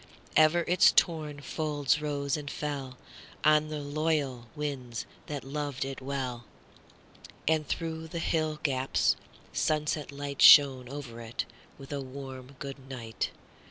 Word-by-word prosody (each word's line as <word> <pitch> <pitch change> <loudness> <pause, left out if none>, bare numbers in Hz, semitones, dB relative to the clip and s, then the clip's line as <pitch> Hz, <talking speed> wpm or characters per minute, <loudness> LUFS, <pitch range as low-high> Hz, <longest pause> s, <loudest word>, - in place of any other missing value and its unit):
Ever 155 +2 +6
its 180 - +6
torn 155 -4 +1
folds 150 -1 0
rose 145 -1 -1
and 145 -2 -5
fellOn 140 -4 -4 0.5
the 155 0 +4
loyal 145 -4 -1
winds 135 -6 -4 0.2
that 145 -3 -4
loved 140 -1 -3
it 135 -1 -6
well; 130 -3 -3 1.0
And 155 -2 +2
through 160 -1 -3
the 165 - -6
hill 155 -2 0
gaps 135 -2 +2 0.4
sunset 150 -1 0
lightShone 140 -2 +6
over 130 -5 -7
it 115 0 -4 0.3
with 135 +1 -8
a 140 - -2
warm 130 0 -8
good 135 -1 -8
night. 115 -4 -3
145 Hz, 125 wpm, -30 LUFS, 135-155 Hz, 1.0 s, Ever